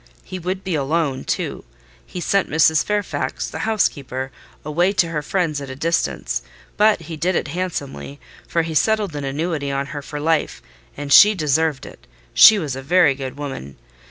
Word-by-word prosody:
He 185 - -7
would 185 +2 -4
be 185 - -3
alone, 145 -1 -1
too. - - -3 0.4
He 180 - -8
sent 195 +2 +1
Mrs. 160 0 +4
Fairfax, 210 -1 -2
the - - -7
housekeeper, 135 - -1 0.3
away 175 +6 +1
to 180 -4 +2
her 155 -2 -2
friends 155 -2 -1
at 140 - -7
a 130 - -6
distance; 165 +4 -1 0.3
but 215 -3 +3
he 165 0 -7
did 175 +4 0
it - - -1
handsomely, 140 - -5 0.3
for 170 - 0
he 160 0 -5
settled 210 0 +1
an 145 - -4
annuity 145 +1 -2
on 140 0 -1
her 145 - -5
for 150 +1 -7
life: 160 +1 0 0.4
and 145 -1 -1
she 210 +1 +8
deserved 155 -2 0
it—she - - +4
was 150 -9 -3
a 135 - -6
very 155 +1 +4
good 135 0 -7
woman. 135 - -7
155 Hz, 175 wpm, -21 LUFS, 140-180 Hz, 0.4 s, she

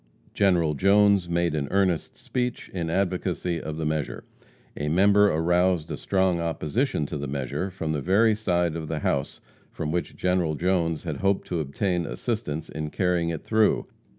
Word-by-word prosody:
General 90 -6 +3
Jones 100 +2 +4
made 85 -1 +1
an 75 -2 -1
earnest 95 -4 0
speech 125 -1 -3
in 85 -3 -3
advocacy 90 -2 -1
of 80 0 -5
the 80 - -2
measure. 75 -1 -2 0.5
A 75 0 -2
member 100 +5 +5
aroused 85 +1 +1
a - - -2
strong 95 -3 +1
opposition 85 - -1
to 70 - -5
the 70 - -4
measure 70 +7 -3
from 80 -4 -4
the 75 -2 -1
very 105 +7 +4
side 90 -6 0
of 80 -2 -4
the - - -3
house 70 - -1 0.3
from 75 -1 -4
which 85 +1 -2
General 90 -4 0
Jones 85 -2 0
had - - -4
hoped 100 0 +1
to 85 - -1
obtain 85 +4 -1
assistance 80 -10 -3
in 75 -1 -5
carrying 90 -1 0
it 80 -2 -4
through. 110 -1 +2
85 Hz, 170 wpm, -25 LUFS, 80-95 Hz, 0.5 s, member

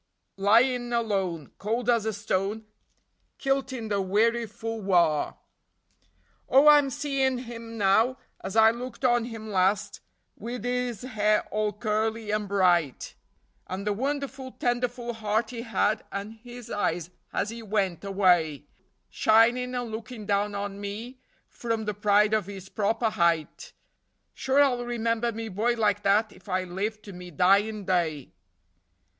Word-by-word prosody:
Lyin' 240 +5 +3
alone, 195 -9 -1
cold 225 +4 -2
as 230 -3 +2
a - - +1
stone, 205 +1 -2 0.7
kilt 270 0 0
in 235 -4 -5
the 200 -1 +1
weariful 225 +2 0
wahr. 170 -6 +2 1.1
Oh, 275 +3 +6
I'm 290 -2 +6
seein' 270 -1 0
him 230 -2 -8
now 220 +6 +3 0.3
as 190 - -5
I 220 0 +7
looked 250 +3 -6
on 240 -2 +3
him 225 -2 -7
last, 200 +2 +1 0.4
wid 235 +1 -6
his 245 -3 -2
hair 215 -4 +1
all 215 0 0
curly 215 +1 -2
and 210 -1 -1
bright, 175 -7 +1 0.5
And 190 +2 -5
the 210 - +1
wonderful, 270 +2 -3
tenderful 245 0 -2
heart 220 +1 -1
he 235 -2 -5
had, 215 -2 0
and 200 +2 -5
his 240 +1 -11
eyes 175 -4 -1 0.2
as 210 - -1
he 230 0 -7
wint 200 -5 -1
away, 175 -7 +2 0.5
Shinin' 240 +3 +3
and 245 -2 -3
lookin' 220 0 -7
down 205 +1 0
on 200 0 -4
me 225 +6 -6 0.3
from 230 -2 -3
the 210 - -1
pride 210 +1 +3
of 215 -4 +1
his 195 -1 -9
proper 220 +2 0
height: 170 - 0 0.6
Sure 270 +2 +3
I'll 250 -3 +1
remember 235 -1 -1
me 225 0 -5
boy 220 +4 0
like 205 -3 +1
that 205 +2 +2
if 205 - -16
I 185 0 0
live 205 +4 -4
to 200 - -10
me 180 0 -9
dyin' 200 +5 +2
day." 165 -7 -1
220 Hz, 145 wpm, -27 LUFS, 200-240 Hz, 1.1 s, I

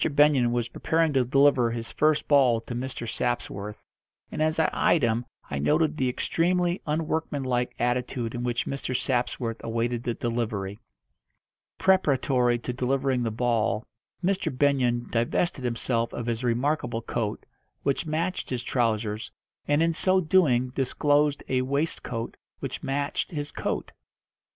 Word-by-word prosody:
Benyon 140 -4 +4
was 120 -1 0
preparing 160 +4 +1
to 130 -2 +3
deliver 135 -1 +4
his 115 0 -5
first 155 -1 +2
ball 130 -5 +5
to 120 - -7
Mr. 120 -1 -4
Sapsworth, 110 -3 -3 0.5
and - - -3
as 155 +1 +2
I 160 - +3
eyed 160 - +3
him 115 +1 +1 0.3
I 70 - -1
noted 155 - +2
the 130 -4 +1
extremely 175 +6 0
unworkmanlike 145 -5 -1
attitude 120 -1 -1
in 120 - -3
which 120 0 -1
Mr. 130 -2 -2
Sapsworth 120 -2 -1
awaited 115 +1 -1
the 120 -1 -2
delivery. 110 -4 -2 1.0
Preparatory 135 -9 +3
to 125 +1 -5
delivering 130 +1 0
the 115 - 0
ball 115 -1 0 0.4
Mr. 190 +1 +1
Benyon 125 -3 +2
divested 130 +5 0
himself 115 -1 -1
of 120 - -4
his 115 0 -2
remarkable 120 -1 0
coat, 110 -3 -3 0.4
which 140 +4 0
matched 165 +4 -2
his 125 -2 -2
trousers, 110 -3 -1 0.4
and 145 +2 +3
in 165 0 +2
so 185 +3 +2
doing 155 -8 +3
disclosed 145 +2 +1
a 130 -1 +1
waistcoat 130 -4 -2 0.2
which - - -5
matched 140 +1 -1
his 145 -5 -4
coat. - - -3
125 Hz, 140 wpm, -26 LUFS, 120-145 Hz, 1.0 s, ball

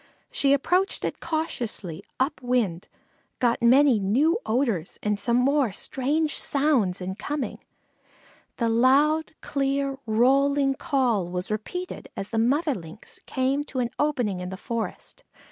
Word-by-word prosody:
She 275 - +2
approached 360 +8 +1
it - - -3
cautiously, 235 - -3 0.2
up 270 +2 0
wind, 235 -9 0 0.5
got 240 -1 +1
many 255 0 +5
new 275 - +2
odors 225 - 0
and 210 -1 0
some 235 +1 +2
more 270 -2 +2
strange 290 +9 -1
sounds 265 -11 +1
in 185 +1 -3
coming. 285 +7 -4 1.0
The 235 - +1
loud, 280 +8 +3
clear, 275 -1 -1
rolling 275 +5 +3
call 260 - 0
was 180 +3 -4
repeated 360 - -5
as 195 - -5
the 225 - -1
mother 285 +7 +2
Lynx 170 -1 -10
came 265 +2 0
to 280 - -8
an 240 -2 0
opening 245 -11 0
in 180 0 -5
the 190 - -6
forest. 230 +3 -5
255 Hz, 135 wpm, -25 LUFS, 215-285 Hz, 1.0 s, many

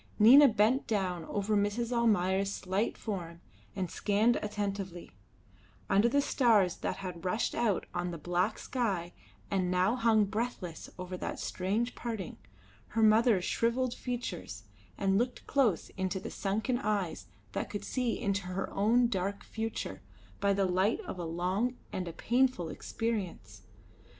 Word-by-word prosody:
Nina 260 +7 +9
bent 230 +3 +2
down 185 -6 -1
over 205 +3 -1
Mrs. 205 +4 0
Almayer's 200 -5 +2
slight 195 +3 -1
form 175 -6 -5 0.4
and 185 -3 -2
scanned 215 +3 +2
attentively, 200 -4 -4 0.8
under 205 +4 +5
the 285 +3 +3
stars 215 -11 +3
that - - -2
had 180 -3 -7
rushed 205 +5 0
out 220 -6 +1
on 175 0 -1
the 170 - -5
black 175 +6 0
sky 195 -10 -2 0.4
and 185 -2 +1
now 185 +5 +2
hung 225 -3 +4
breathless 210 -5 -4
over 180 0 -5
that - - -4
strange 210 +7 -1
parting, 225 -6 -5 0.5
her 225 0 0
mother's 215 -3 +5
shrivelled 240 +2 +1
features, 110 - -5 0.3
and 195 0 +2
looked 245 +1 -2
close 245 - +1
into 190 0 -2
the - - -7
sunken 220 +5 -1
eyes 190 - -2 0.2
that - - -3
could 205 - -5
see 250 -3 -1
into 200 -4 -1
her 185 +1 -3
own 230 +5 +4
dark 200 -2 -2
future 220 - -4 0.4
by 200 0 +2
the 195 0 +2
light 185 +4 +2
of 185 - -7
a 175 - -3
long 185 +9 -1 0.2
and 185 -1 -3
a 170 - -5
painful 240 -6 +1
experience. 185 - -4
200 Hz, 145 wpm, -31 LUFS, 180-230 Hz, 0.8 s, Nina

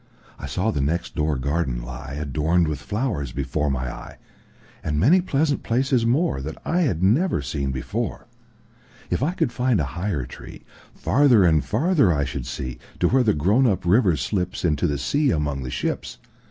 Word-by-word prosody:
I 70 - -6
saw 95 +10 0
the 70 - -1
next 85 +5 -1
door 75 0 0
garden 70 -1 -1
lie, 65 +2 -7
Adorned 80 +4 +1
with 75 -2 -3
flowers, 100 - -2
before 75 +3 -1
my 65 -2 -2
eye, - - -10 0.7
And 75 -1 -1
many 165 - +5
pleasant 145 -4 0
places 125 0 +1
moreThat 115 - 0
I 175 - +1
had 95 - 0
never 120 - +2
seen 70 0 -2
before. 65 -1 -3 0.9
If - - 0
I 155 +6 +1
could 120 - 0
find 125 -4 +1
a - - +1
higher 85 -8 -2
treeFarther 120 - 0
and 80 -3 +3
farther 140 - +2
I 70 -3 +1
should 70 -3 -5
see, 65 -2 -5 0.2
To - - +3
where 130 +1 +4
the 110 -7 +2
grown 100 - +3
up 95 -5 0
river 95 0 +4
slipsInto 85 -2 -1
the 70 - -1
sea 145 - +1
among 75 - -1
the 65 - -5
ships. - - -3
85 Hz, 170 wpm, -23 LUFS, -, 0.9 s, many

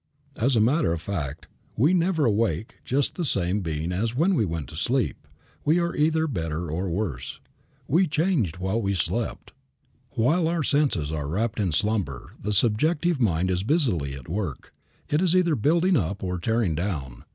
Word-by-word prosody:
As 125 +3 +2
a - - +4
matter 125 - +3
of 85 - -3
fact 80 -4 -4 0.3
we 145 +10 +4
never 170 -4 +2
awake 110 -4 0
just 135 +2 0
the 175 - -3
same 100 - 0
being 80 0 -3
as 110 +6 -1
when 170 +8 +3
we 115 - +2
went 80 -5 -4
to - - -10
sleep. 120 - -1 0.4
We 155 +3 +3
are 170 0 0
either 160 +1 +2
better 85 - -3
or 90 +4 -2
worse. 85 - -3 0.5
We 175 +6 +3
changed 155 - 0
while 95 +5 -1
we 100 -1 0
slept. 90 - -2 0.6
While 160 +9 +2
our 165 -1 0
senses 135 - +1
are 75 -3 -3
wrapped 110 +8 -1
in 95 -4 +1
slumber, 85 - -1
the 105 - -2
subjective 145 - +2
mind 95 -4 +2
is 90 0 0
busily 100 - 0
at 65 -3 -10
work. 90 -6 -4 0.3
It 150 +3 +1
is 185 -1 +3
either 175 -3 +3
building 170 - +3
up 100 - -1
or 90 -1 -2
tearing 110 -1 +1
down. 75 -8 -4
105 Hz, 175 wpm, -25 LUFS, -, 0.6 s, a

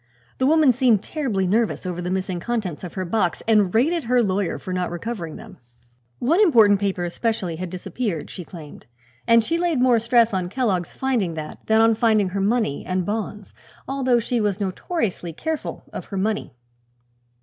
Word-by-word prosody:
The 260 - +3
woman 310 -2 +5
seemed 240 -5 +3
terribly 245 - -1
nervous 215 +2 0
over 180 -1 -3
the 180 - -3
missing 185 -1 -2
contents 200 -6 -3
of 180 - -7
her 185 -1 -2
box 180 -1 0
and 210 -5 +4
rated 300 - +1
her 245 +1 +3
lawyer 195 -2 -1
for 185 - -6
not 180 -1 -1
recovering 175 -2 -5
them. 210 -5 -12 0.6
One 325 - +2
important 220 - +6
paper, 195 -3 -1
especially, 180 -1 -2
had 185 +1 -5
disappeared, 185 -1 -4
she 180 - -7
claimed, 160 -3 -12 0.4
and 230 -1 +6
she 330 +8 -1
laid 340 -6 +1
more 250 -2 +4
stress 235 -1 +3
on 185 -2 -1
Kellogg's 195 -7 -1
finding 235 -11 -1
that 155 -1 -7
than 220 0 +4
on 225 0 +5
finding 215 -3 +2
her 195 +2 -2
money 210 -7 0
and 185 -1 -1
bonds, 210 0 -4 0.3
although 260 -2 +1
she 235 +1 0
was 205 -1 0
notoriously 195 - -3
careful 320 - -4
of - - -6
her 195 - -6
money. 210 -6 -2
210 Hz, 180 wpm, -23 LUFS, 185-240 Hz, 0.6 s, important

